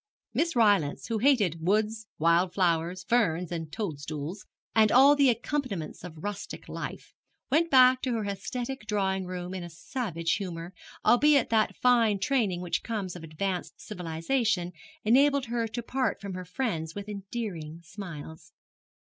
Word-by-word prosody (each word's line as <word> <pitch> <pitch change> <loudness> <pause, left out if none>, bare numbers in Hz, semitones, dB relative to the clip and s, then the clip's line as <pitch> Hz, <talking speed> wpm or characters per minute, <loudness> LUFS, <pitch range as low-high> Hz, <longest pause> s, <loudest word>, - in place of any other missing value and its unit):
Miss 335 -1 0
Rylance, 205 -11 +3
who 225 -1 0
hated 205 - +3
woods, 215 +3 +1
wild 170 +3 +3
flowers, 175 -1 +1
ferns 180 -6 +1
and 165 -3 -4
toadstools, 155 -2 -5 0.3
and 220 -1 +5
all 275 +3 +7
the 280 -2 +5
accompaniments 235 - -2
of 160 -3 -9
rustic 205 -1 -6
life, - - -7 0.4
went 330 +4 +3
back 255 -2 +6
to 255 - -1
her 220 -2 -1
aesthetic 225 +4 -4
drawing 190 -3 0
room 180 0 -5
in 185 - -4
a 175 - -7
savage 165 -2 -3
humour, 175 -3 -6 0.3
albeit 285 +2 +5
that 220 -1 +2
fine 235 -4 +4
training 195 -4 0
which 170 -2 -1
comes 205 -6 -4
of 175 - -9
advanced 175 +3 -4
civilization 180 +2 -1 0.3
enabled 275 +4 +4
her 230 -1 -1
to 235 +2 -5
part 260 +2 -1
from 200 -2 -6
her 180 0 -6
friends 170 -6 -3
with 200 0 -6
endearing 195 -6 -5
smiles. 165 -4 -9
200 Hz, 145 wpm, -28 LUFS, 170-235 Hz, 0.4 s, all